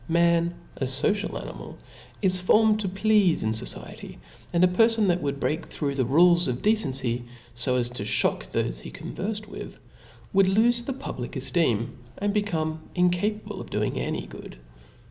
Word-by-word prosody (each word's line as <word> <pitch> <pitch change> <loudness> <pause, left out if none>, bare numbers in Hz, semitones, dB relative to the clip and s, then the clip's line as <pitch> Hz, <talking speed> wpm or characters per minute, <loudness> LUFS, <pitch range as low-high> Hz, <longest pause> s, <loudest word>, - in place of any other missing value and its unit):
Man, 170 0 +3 0.2
a 135 - -1
fociablfl^^ 155 +11 -1
animal, - - -9 0.5
is 185 -1 +3
formed 215 +4 +4
to 200 -3 -1
pleafe 195 -2 +3
in 110 - +1
fociety; 110 - -4 0.3
and 175 0 +3
a - - +7
per? 225 +6 +4
fon 225 -2 +1
that 175 0 +1
would 140 -1 -2
break 155 +4 -1
through 140 -3 -2
the 130 -2 0
rules 170 +6 +5
of 125 -1 -3
decency^ 135 - +1
ib 120 - -13 0.5
as 120 -1 +2
to 125 - -5
ihock 100 - +1
thofe - - -2
he - - -8
converfed 210 +2 -5
with, 205 - -9 0.5
would 195 -1 +5
lofe 235 +5 +3
the 270 - -1
public 245 - -6
eftcem, 125 -5 +1 0.3
and 205 0 -1
become 160 -7 -1
incapable 180 +4 0
of - - -10
doing - - -1
apy - - -3
good. - - -11
175 Hz, 165 wpm, -26 LUFS, 135-205 Hz, 0.5 s, a